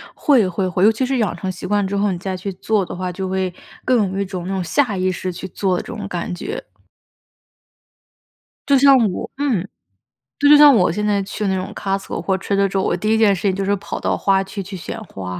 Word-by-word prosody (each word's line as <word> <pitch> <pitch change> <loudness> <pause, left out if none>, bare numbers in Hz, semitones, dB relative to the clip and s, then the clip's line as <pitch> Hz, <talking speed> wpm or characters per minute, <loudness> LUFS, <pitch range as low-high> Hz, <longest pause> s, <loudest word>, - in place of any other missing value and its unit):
会， 245 -10 +3
会， 185 +1 -1
会， 180 +1 +1
尤 215 - +7
其 240 +4 -1
是 265 0 0
养 205 -7 0
成 190 +2 -4
习 180 - -7
惯 205 0 +1
之 200 +1 -3
后， 200 -1 +1
你 175 - -4
再 190 +1 -4
去 195 +2 -5
做 205 +1 0
的 - - -7
话， 180 0 -3
就 190 +1 -4
会 190 -1 -1 0.3
更 215 -7 +2
有 195 - -3
一 - - 0
种 185 -2 -6
那 195 - -3
种 190 - -1
下 210 - 0
意 185 0 +1
识 185 +1 -4
去 190 +2 -7
做 185 0 -1
的 - - -3
这 - - -16
种 210 -4 -6
感 180 -1 -4
觉。 420 - -5 2.1
就 280 - +5
像 275 +1 +7 0.2
我 - - -5
嗯， 265 -11 0 0.7
对， 285 - +3
就 - - +10
像 295 -1 +8
我 180 -6 +3
现 210 +5 -2
在 205 -2 +1
去 205 +1 -4
那 190 - +1
种 185 +1 -4
Costco 195 -3 -3
或 190 +2 0
者 200 +2 -2
Trader 200 0 +3
Joe， 195 0 0
我 - - +1
第 215 - -2
一 225 - +3
件 210 -3 +4
事 165 - -7
情 195 -2 +1
就 195 0 -2
是 200 +1 +2
跑 - - -6
到 - - 0
花 195 -1 +2
区 195 +1 -6
去 190 0 -7
选 225 +6 -7
花。 90 - -7
195 Hz, 315 characters per minute, -20 LUFS, 185-210 Hz, 2.1 s, 就